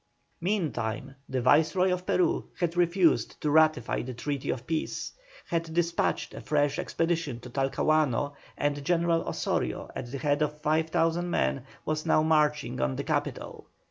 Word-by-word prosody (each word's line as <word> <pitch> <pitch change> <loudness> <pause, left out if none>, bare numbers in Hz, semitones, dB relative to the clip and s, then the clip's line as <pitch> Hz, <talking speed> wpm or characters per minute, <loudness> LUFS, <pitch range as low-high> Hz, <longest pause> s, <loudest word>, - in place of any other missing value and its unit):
Meantime, 155 - -2 0.2
the 130 - -1
Viceroy 160 +8 +4
of 180 0 -4
Peru 185 - +2
had 170 -1 0
refused 175 0 +2
to 150 - 0
ratify 155 -5 +3
the 125 0 -6
treaty 140 +2 -3
of 125 -1 -2
peace, 160 -1 -2 0.3
had 165 -1 -2
despatched 170 -1 0
a - - -7
fresh 145 +1 +1
expedition 165 -8 -1
to 125 0 -11
Talcahuano, 145 +1 +1 0.2
and 145 0 -1
General 170 +1 +2
Osorio - - -2
at 120 - -5
the 140 - -3
head 145 +2 0
of 150 0 -1
5,000 160 +2 +1
men 65 - 0 0.2
was 155 0 -1
now 155 - +4
marching 150 - +2
on 65 0 0
the - - -3
capital. - - -3
155 Hz, 150 wpm, -28 LUFS, 140-165 Hz, 0.3 s, Viceroy